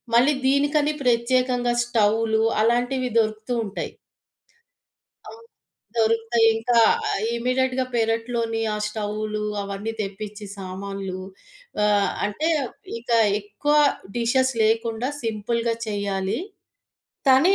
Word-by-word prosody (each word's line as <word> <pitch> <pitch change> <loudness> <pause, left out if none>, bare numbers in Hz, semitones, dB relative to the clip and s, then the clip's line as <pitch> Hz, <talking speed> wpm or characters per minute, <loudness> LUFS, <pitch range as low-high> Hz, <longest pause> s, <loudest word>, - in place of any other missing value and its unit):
మళ్ళీ 265 +5 +5
దీనికని 290 +2 +2
ప్రత్యేకంగా 245 0 +2
స్టవ్వులు, 220 -1 +2 0.2
అలాంటివి 245 +2 +1
దొరుకుతూ 215 +2 -1
ఉంటాయి. 200 - -5 1.4
ఆ! - - -7 0.7
దొరుకుతాయింకా 225 +1 +3 0.3
ఆహ్, 200 - -1
ఇమీడియేట్‌గా 255 +1 0
పెరట్లోని 225 0 0
ఆ - - -2
స్టవ్వులు, 210 0 -3 0.2
అవన్నీ 200 +3 -4
తెప్పిచి 205 +1 -7
సామాన్లు, 195 0 -5 0.6
ఆహ్, 205 -1 +3 0.2
అంటే, 300 +11 -1 0.5
ఇంకా 235 0 +1 0.2
ఎక్కువ 210 +9 -1 0.4
డిషెస్ 260 +3 +2
లేకుండా, 225 +2 0
సింపుల్‌గా 230 +1 -1
చెయ్యాలి. 200 -1 -2 0.9
తనీ 310 +9 +6
225 Hz, 90 wpm, -23 LUFS, 210-245 Hz, 1.4 s, తనీ